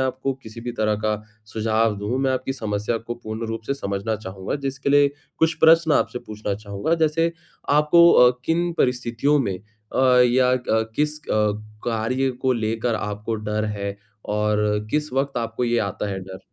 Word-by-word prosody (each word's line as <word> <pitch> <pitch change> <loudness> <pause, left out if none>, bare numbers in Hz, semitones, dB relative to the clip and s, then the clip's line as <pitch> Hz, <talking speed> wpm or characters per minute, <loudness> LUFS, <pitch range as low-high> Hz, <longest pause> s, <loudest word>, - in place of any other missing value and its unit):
आपको 130 +1 -1
किसी 110 +1 -10
भी 120 +1 -5
तरह 110 -2 +1
का 105 -1 0 0.3
सुझाव 110 -1 +1
दूँ, 110 +6 -2
मैं 135 0 +1
आपकी 130 +1 -2
समस्या 105 -2 -2
को 120 +1 -6
पूर्ण 110 -1 -6
रूप 115 0 -4
से 140 - 0
समझना 100 -2 -2
चाहूँगा 95 0 -5
जिसके 135 +1 -2
लिए 145 0 +5 0.3
कुछ 165 +1 +3
प्रश्न 160 -1 +6
आपसे 125 - +1
पूछना 105 -2 -5
चाहूँगा। 100 +8 -2
जैसे 165 +1 +1 0.4
आपको 150 +4 +6
अ, 125 0 +7
किन 170 +1 +1
परिस्थितियों 125 +3 +1
में 100 -8 -1
अ, 110 +5 +1
या 125 +1 +4
क 110 0 +1
किस 150 0 0
अ, 105 -1 +2 0.3
कार्य 120 +4 0
को 130 - +3
लेकर 115 0 -1
आपको 105 +1 -3
डर 105 0 -2
है 100 -1 -4 0.3
और 105 0 0
किस 150 -2 -1
वक़्त 135 0 -1
आपको 115 +1 -2
ये 120 0 +1
आता 100 0 -2
है 95 - -3
डर? 95 0 -9
115 Hz, 175 wpm, -23 LUFS, 105-135 Hz, 0.4 s, अ